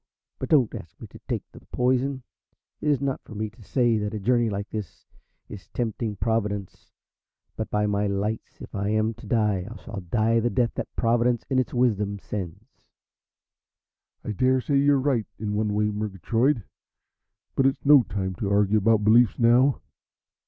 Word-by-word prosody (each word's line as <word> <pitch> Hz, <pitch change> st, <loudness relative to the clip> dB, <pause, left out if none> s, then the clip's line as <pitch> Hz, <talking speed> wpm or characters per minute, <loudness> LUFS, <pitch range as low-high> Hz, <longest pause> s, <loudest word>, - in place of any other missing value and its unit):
But -, -, -4 dB
don't 135 Hz, -7 st, +4 dB
ask 80 Hz, -, -9 dB
me -, -, -8 dB
to -, -, -13 dB
take -, -, -2 dB
the -, -, -13 dB
poison. 130 Hz, +1 st, 0 dB, 0.6 s
It 150 Hz, -, -1 dB
is 145 Hz, -4 st, +2 dB
not 135 Hz, -2 st, -1 dB
for 110 Hz, -, -12 dB
me 110 Hz, 0 st, -3 dB
to 110 Hz, -, -19 dB
say 120 Hz, +1 st, +1 dB
that 105 Hz, +1 st, -3 dB
a -, -, -3 dB
journey 120 Hz, +2 st, +2 dB
like 100 Hz, 0 st, -3 dB
this 105 Hz, -5 st, -7 dB, 0.4 s
is 100 Hz, -3 st, -10 dB
tempting 115 Hz, -2 st, -2 dB
Providence, 105 Hz, -3 st, -2 dB, 0.7 s
but, 110 Hz, -, -4 dB
by 105 Hz, 0 st, +1 dB
my 105 Hz, 0 st, 0 dB
lights, 100 Hz, +3 st, -3 dB
if -, -, -10 dB
I 100 Hz, +1 st, -1 dB
am 110 Hz, +1 st, +1 dB
to -, -, -13 dB
die 105 Hz, -5 st, +1 dB
I 115 Hz, -, -9 dB
shall 105 Hz, -4 st, -6 dB
die 110 Hz, +6 st, +1 dB
the 120 Hz, +1 st, +1 dB
death 120 Hz, -1 st, +1 dB
that -, -, -4 dB
Providence 120 Hz, +1 st, +2 dB
in 130 Hz, -, +3 dB
its 130 Hz, -, -1 dB
wisdom 105 Hz, -5 st, +1 dB
sends." 95 Hz, -4 st, -6 dB, 1.6 s
"I -, -, -3 dB
daresay 130 Hz, +5 st, +2 dB
you're 140 Hz, 0 st, +4 dB
right 130 Hz, -5 st, 0 dB
in 105 Hz, -1 st, -3 dB
one 105 Hz, 0 st, 0 dB
way, 105 Hz, +1 st, +1 dB
Murgatroyd, 110 Hz, -, 0 dB, 0.9 s
but 135 Hz, -, +3 dB
it's 135 Hz, -, -2 dB
no 145 Hz, -1 st, +8 dB
time 95 Hz, -4 st, -3 dB
to 100 Hz, -, -1 dB
argue 100 Hz, +1 st, +3 dB
about 110 Hz, +1 st, +3 dB
beliefs 115 Hz, +1 st, +5 dB
now. 125 Hz, +4 st, +4 dB
110 Hz, 175 wpm, -25 LUFS, 105-125 Hz, 1.6 s, no